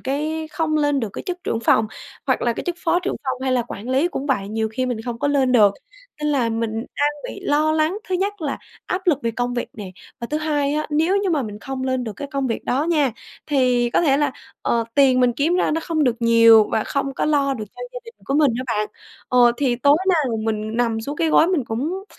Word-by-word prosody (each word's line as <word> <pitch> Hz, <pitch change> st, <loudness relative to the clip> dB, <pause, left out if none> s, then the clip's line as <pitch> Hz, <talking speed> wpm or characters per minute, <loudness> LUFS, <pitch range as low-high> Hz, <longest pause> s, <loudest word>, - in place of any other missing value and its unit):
cái 310 Hz, +4 st, -2 dB
không 320 Hz, -1 st, 0 dB
lên 290 Hz, -2 st, +1 dB
được 225 Hz, -, -2 dB
cái -, -, -6 dB
chức 360 Hz, -1 st, -5 dB
trưởng 225 Hz, -, -1 dB
phòng, 220 Hz, -1 st, +3 dB, 0.4 s
hoặc 260 Hz, -, +1 dB
là 240 Hz, -, +2 dB
cái -, -, -6 dB
chức 350 Hz, -, -1 dB
phó 345 Hz, 0 st, +1 dB
trưởng 370 Hz, -, -2 dB
phòng 260 Hz, -1 st, -3 dB
hay 260 Hz, -1 st, 0 dB
là 250 Hz, -2 st, +2 dB
quản 215 Hz, +5 st, -7 dB
lý 270 Hz, +6 st, +2 dB
cũng 280 Hz, -5 st, -5 dB
vậy, 205 Hz, -8 st, 0 dB
nhiều 220 Hz, +1 st, -1 dB
khi 255 Hz, +4 st, -2 dB
mình 245 Hz, -3 st, -2 dB
không 240 Hz, -2 st, -4 dB
có 285 Hz, -, 0 dB
lên 270 Hz, -3 st, +2 dB
được. 210 Hz, -5 st, +5 dB, 0.5 s
Nên 300 Hz, -, +1 dB
là 255 Hz, -5 st, +1 dB
mình 225 Hz, 0 st, -1 dB
đang 255 Hz, +6 st, -1 dB, 0.2 s
bị -, -, -9 dB
lo 305 Hz, +2 st, +2 dB
lắng, 315 Hz, +5 st, +1 dB
thứ 375 Hz, -, 0 dB
nhất 395 Hz, +1 st, -1 dB
là 285 Hz, -3 st, -2 dB, 0.3 s
áp 370 Hz, +1 st, -3 dB
lực 310 Hz, -6 st, +3 dB
về 230 Hz, -, 0 dB
công 245 Hz, +2 st, -2 dB
việc 240 Hz, -, -3 dB
nè 200 Hz, -4 st, -8 dB, 0.3 s
và 235 Hz, -, -3 dB
thứ 300 Hz, -, 0 dB
hai 295 Hz, -2 st, 0 dB
á 305 Hz, 0 st, -1 dB
nếu 320 Hz, +6 st, +2 dB
như 400 Hz, -2 st, 0 dB
mà 305 Hz, -5 st, +1 dB
mình 210 Hz, -3 st, -7 dB
không 265 Hz, +4 st, -5 dB
lên 260 Hz, -1 st, -1 dB
được 220 Hz, -, -4 dB
cái 285 Hz, -, -6 dB
công 275 Hz, -1 st, -1 dB
việc 230 Hz, -, -3 dB
đó 275 Hz, +5 st, 0 dB
nha, 300 Hz, -7 st, +2 dB, 0.3 s
thì 250 Hz, -4 st, +2 dB
có -, -, +2 dB
thể 275 Hz, -5 st, +3 dB
là, 290 Hz, -2 st, +1 dB, 0.3 s
ờ, 230 Hz, -1 st, +1 dB
tiền 265 Hz, -3 st, +5 dB
mình 250 Hz, -1 st, +3 dB
kiếm 295 Hz, +8 st, +1 dB
ra -, -, +1 dB
nó 320 Hz, +2 st, 0 dB
không 315 Hz, -3 st, 0 dB
được 245 Hz, -3 st, +1 dB
nhiều 230 Hz, -2 st, +6 dB
và 215 Hz, -, +1 dB
không 275 Hz, -1 st, -2 dB
có -, -, -1 dB
lo 280 Hz, -2 st, +2 dB
được 220 Hz, -4 st, -5 dB
cho -, -, -10 dB
gia -, -, -5 dB
đình 460 Hz, 0 st, -12 dB
của 275 Hz, -, -2 dB
mình 295 Hz, -3 st, +4 dB
á 255 Hz, -, -3 dB
bạn. 210 Hz, 0 st, -1 dB, 0.4 s
Ờ, 245 Hz, -1 st, +5 dB
thì 255 Hz, -4 st, +1 dB
tối 285 Hz, +4 st, +4 dB
nào 300 Hz, -10 st, +2 dB
mình 215 Hz, 0 st, -2 dB
nằm 230 Hz, -2 st, 0 dB
xuống 280 Hz, +6 st, -5 dB
cái 325 Hz, -, +1 dB
gối 315 Hz, -, +5 dB
mình 345 Hz, -7 st, 0 dB
cũng, 305 Hz, +13 st, -3 dB
270 Hz, 260 wpm, -21 LUFS, 235-310 Hz, 0.5 s, nhiều